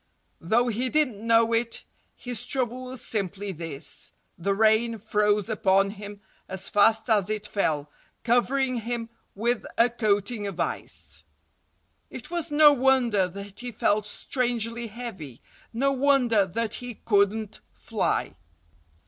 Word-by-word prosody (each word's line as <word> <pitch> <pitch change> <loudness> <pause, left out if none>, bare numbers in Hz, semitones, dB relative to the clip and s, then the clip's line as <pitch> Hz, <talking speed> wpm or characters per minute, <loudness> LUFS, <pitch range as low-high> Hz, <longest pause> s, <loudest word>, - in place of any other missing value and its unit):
Though 230 +9 +2
he 245 +3 -1
didn't 250 -8 0
know 230 0 +4
it, 230 0 0 0.3
his 245 -1 -5
trouble 255 -1 -2
was 255 -1 -6
simply 200 -1 -3
this: 160 -4 -5 0.2
The 195 +3 -1
rain 220 +2 +3
froze 210 -1 +1
upon 195 -3 +2
him 205 0 -9 0.3
as 190 0 -4
fast 220 +1 +4
as 210 -4 +2
it 215 -1 -3
fell, 155 -8 -1 0.4
covering 255 +2 +2
him 230 0 -4 0.3
with 235 +3 0
a 235 +1 +4
coating 210 -1 0
of 195 - -7
ice. - - -4 0.9
It - - -9
was 340 -2 -1
no 295 0 +7
wonder 245 -7 +3
that 200 +2 -9
he 245 0 -5
felt 210 -1 +1
strangely 235 0 -2
heavy—no 225 - -5
wonder 255 -7 +3
that 225 +3 -2
he 245 -2 -6
couldn't 205 0 +1
fly. - - -2
225 Hz, 130 wpm, -26 LUFS, 200-245 Hz, 0.9 s, no